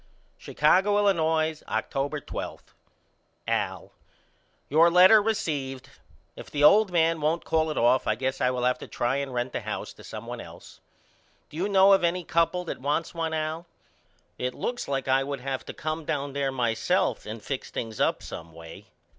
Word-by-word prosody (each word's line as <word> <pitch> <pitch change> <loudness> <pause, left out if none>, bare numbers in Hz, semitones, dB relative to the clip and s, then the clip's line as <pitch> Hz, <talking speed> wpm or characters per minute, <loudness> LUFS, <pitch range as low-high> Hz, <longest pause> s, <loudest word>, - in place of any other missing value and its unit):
Chicago, 190 +7 +2
Illinois, 160 -6 +1
October 145 +2 -2
12. - - -7 0.8
AL: - - -2 0.8
Your 160 +4 +5
letter 185 +5 +7
received. 150 - -3 0.4
If - - -10
the 145 -1 -1
old 205 +5 +6
man 165 -2 +2
won't 160 +3 0
call 160 0 +1
it 155 - -4
off 120 +2 +3
I 110 - +2
guess 130 +3 -3
I 125 - +3
will 125 -1 -2
have 125 0 +1
to - - -9
try 120 +3 -1
and 140 -1 -3
rent 125 0 -3
the - - -2
house - - -5
to - - -16
some - - -8
one - - -6
else. - - -13 0.7
Do 150 - -9
you 190 +5 -1
know 195 0 +6
of 195 - +3
any 175 +1 +1
couple 170 +2 0
that 165 - -6
wants 150 +4 -1
one 165 -1 -2
Al? 155 +2 -3 0.7
It 125 0 -2
looks 245 0 -4
like 135 -1 -2
I 135 +1 +3
would 140 0 -5
have 135 0 -3
to - - -6
come 155 +1 -4
down 140 -2 -3
there 140 -1 -1
myself 120 -5 0
and 110 +2 -6
fix 130 +5 -5
things 110 -2 -5
up - - +1
someway. 80 0 -10
150 Hz, 180 wpm, -26 LUFS, 130-170 Hz, 0.8 s, letter